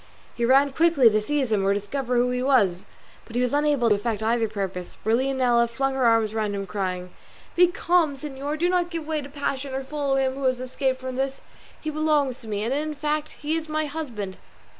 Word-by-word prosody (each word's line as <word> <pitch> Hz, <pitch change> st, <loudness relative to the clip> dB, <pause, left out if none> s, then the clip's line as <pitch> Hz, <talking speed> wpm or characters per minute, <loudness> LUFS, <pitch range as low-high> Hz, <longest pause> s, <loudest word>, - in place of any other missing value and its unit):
He 235 Hz, -, -1 dB
ran 275 Hz, +3 st, +5 dB
quickly 310 Hz, -7 st, +5 dB
to 215 Hz, 0 st, +2 dB
seize 270 Hz, +1 st, -1 dB
him 205 Hz, -2 st, +2 dB
or 200 Hz, +1 st, +2 dB
discover 250 Hz, +5 st, -2 dB
who 245 Hz, +1 st, +2 dB
he 250 Hz, 0 st, -1 dB
was, 210 Hz, -10 st, +2 dB, 0.4 s
but 230 Hz, -, -12 dB
he 245 Hz, -, +2 dB
was 250 Hz, -, 0 dB
unable 290 Hz, -4 st, +2 dB
to -, -, +5 dB
effect 215 Hz, +1 st, -2 dB
either 225 Hz, 0 st, +2 dB
purpose, 195 Hz, -4 st, -5 dB
for 220 Hz, -, +1 dB
Leonela 250 Hz, -2 st, +2 dB
flung 270 Hz, +3 st, -1 dB
her 265 Hz, -2 st, +1 dB
arms 225 Hz, -2 st, +3 dB
round 215 Hz, -2 st, -1 dB
him 195 Hz, 0 st, -3 dB
crying, 185 Hz, -2 st, -3 dB, 0.4 s
"Be 360 Hz, +1 st, +6 dB
calm, 340 Hz, -3 st, +1 dB
señor; 285 Hz, +1 st, -4 dB
do 345 Hz, +3 st, +1 dB
not 355 Hz, -1 st, +1 dB
give 330 Hz, -3 st, -4 dB
way 310 Hz, -1 st, -1 dB
to 280 Hz, -, -9 dB
passion 275 Hz, -1 st, -3 dB
or 270 Hz, -, -2 dB
follow 280 Hz, 0 st, -1 dB
him 265 Hz, -1 st, +1 dB
who 275 Hz, +1 st, -6 dB
has 255 Hz, -1 st, +2 dB
escaped 260 Hz, +1 st, -1 dB
from 260 Hz, -1 st, -5 dB
this; 270 Hz, 0 st, -2 dB, 0.4 s
he 310 Hz, -, -4 dB
belongs 300 Hz, -4 st, +1 dB
to 225 Hz, -, -10 dB
me, 210 Hz, -1 st, -2 dB
and 235 Hz, +4 st, 0 dB
in 300 Hz, +2 st, -2 dB
fact 300 Hz, +1 st, -2 dB
he 305 Hz, +2 st, 0 dB
is 320 Hz, -1 st, -4 dB
my 310 Hz, 0 st, 0 dB
husband." 240 Hz, -11 st, -5 dB
265 Hz, 225 wpm, -25 LUFS, 225-295 Hz, 0.4 s, Be